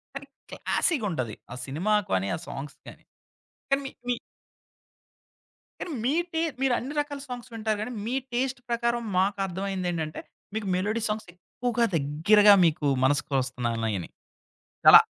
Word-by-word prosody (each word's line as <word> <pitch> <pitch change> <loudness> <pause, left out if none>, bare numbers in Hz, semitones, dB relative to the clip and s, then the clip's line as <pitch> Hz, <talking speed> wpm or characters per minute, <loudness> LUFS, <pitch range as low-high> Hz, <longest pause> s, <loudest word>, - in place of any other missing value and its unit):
కానీ, 275 0 -7 0.2
క్లాసిగుంటది. 180 - 0 0.2
ఆ - - -6
సినిమా 165 +10 0 0.2
కానీ, 95 +1 +1
ఆ - - -4
సాంగ్స్ 140 0 -7
కాని. - - -12 0.7
కానీ, 275 - +3
మి - - -5 0.2
మీ 245 - +3 1.7
కానీ, 355 - -4
మీ 260 +4 +2 0.2
టే 320 - +1 0.2
మీరు 265 -2 +3
అన్ని 265 +5 -5
రకాల 285 -1 -6
సాంగ్స్ 250 -1 -7
వింటారు 220 -1 -1
కానీ, 245 +3 -4
మీ 240 +3 -1 0.2
టేస్ట్ 255 +1 0
ప్రకారం 235 0 +1 0.2
మాకర్థమైందేంటంటే, 185 -4 -1 0.3
మీకు 220 -2 -2
మెలోడీ 210 +5 0
సాంగ్స్ 210 -1 -3
ఎక్కువగా 235 +6 -1
దగ్గరగా 170 +9 +6
మీకు 160 -2 +1 0.2
మనసుకొస్తున్నాయిన్నాయని. 125 - 0 0.8
చాలా - - +12
205 Hz, 125 wpm, -27 LUFS, 150-240 Hz, 1.7 s, చాలా